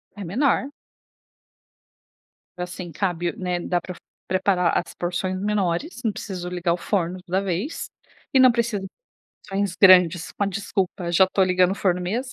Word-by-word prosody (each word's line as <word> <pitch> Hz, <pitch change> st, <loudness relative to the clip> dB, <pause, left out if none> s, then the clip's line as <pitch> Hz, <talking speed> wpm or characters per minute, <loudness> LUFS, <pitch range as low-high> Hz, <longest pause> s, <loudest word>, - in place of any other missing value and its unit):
é 205 Hz, -, -7 dB
menor 265 Hz, -, +1 dB, 1.9 s
assim 180 Hz, 0 st, -6 dB
cabe, 175 Hz, 0 st, -1 dB
né, 180 Hz, -2 st, -2 dB
dá 175 Hz, 0 st, -1 dB
pre 180 Hz, -, -7 dB, 0.3 s
preparar 185 Hz, -2 st, +1 dB
as 170 Hz, -, -5 dB
porções 185 Hz, +2 st, -2 dB
menores, 205 Hz, -, -1 dB
não 220 Hz, -, +2 dB
preciso 180 Hz, -4 st, -6 dB
ligar 175 Hz, -1 st, -1 dB
o -, -, 0 dB
forno, 180 Hz, -1 st, -1 dB
toda 185 Hz, +1 st, -1 dB
vez, 195 Hz, -, -3 dB, 0.5 s
e 265 Hz, -, +6 dB
não 255 Hz, -1 st, +8 dB
precisa 230 Hz, -4 st, -1 dB, 0.7 s
porções 195 Hz, -1 st, -1 dB
grandes, 180 Hz, -3 st, +6 dB
com 205 Hz, -, -1 dB
a -, -, -1 dB
desculpa: 195 Hz, -2 st, -2 dB
"Já 190 Hz, +2 st, +6 dB
tô 195 Hz, -, +3 dB
ligando 185 Hz, 0 st, +3 dB
o -, -, -2 dB
forno 180 Hz, -3 st, 0 dB
mesmo." 235 Hz, +9 st, -3 dB
185 Hz, 155 wpm, -23 LUFS, 175-200 Hz, 1.9 s, não